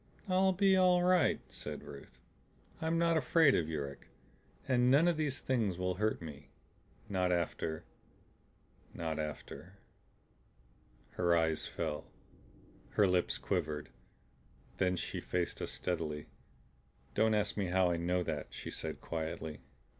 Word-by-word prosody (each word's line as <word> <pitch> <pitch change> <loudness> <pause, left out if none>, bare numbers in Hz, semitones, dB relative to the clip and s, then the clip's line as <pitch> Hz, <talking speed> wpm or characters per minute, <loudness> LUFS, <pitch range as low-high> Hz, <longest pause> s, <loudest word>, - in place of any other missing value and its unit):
"I'll 190 0 +4
be 190 +1 +4
all 180 -1 +5
right," 180 -1 +4
said - - -7
Ruth. 70 -1 -11 0.6
"I'm 160 +1 +1
not 170 -1 +3
afraid 160 -2 +5
of 80 -2 +1
Yuruk. 70 -3 -5 0.6
And 125 -1 +4
none 145 +6 +6
of 175 - +3
these 150 -4 -1
Things 110 -9 0
will 90 0 0
hurt 105 -1 -1
me 75 -3 -9 0.6
not 90 -2 +1
after 85 -2 -1 1.1
not 80 -2 -3
after 80 +4 -6 0.6
" 60 0 -33
Her 85 -1 +4
eyes 80 -1 +1
fell, 75 - -3 0.9
her 105 - +5
lips 90 -1 +2
quivered, 80 -6 -2 0.9
then 90 -1 +2
she - - -4
faced 90 -1 -2
us - - -2
steadily. 75 -4 -2 0.9
"Don't 110 0 +3
ask 105 -1 0
me 100 -3 -1
how 90 0 +3
I 85 - 0
know 90 +1 0
that," - - -3
she - - -7
said - - -4
quietly. 80 -2 -4
90 Hz, 135 wpm, -34 LUFS, 80-130 Hz, 1.1 s, none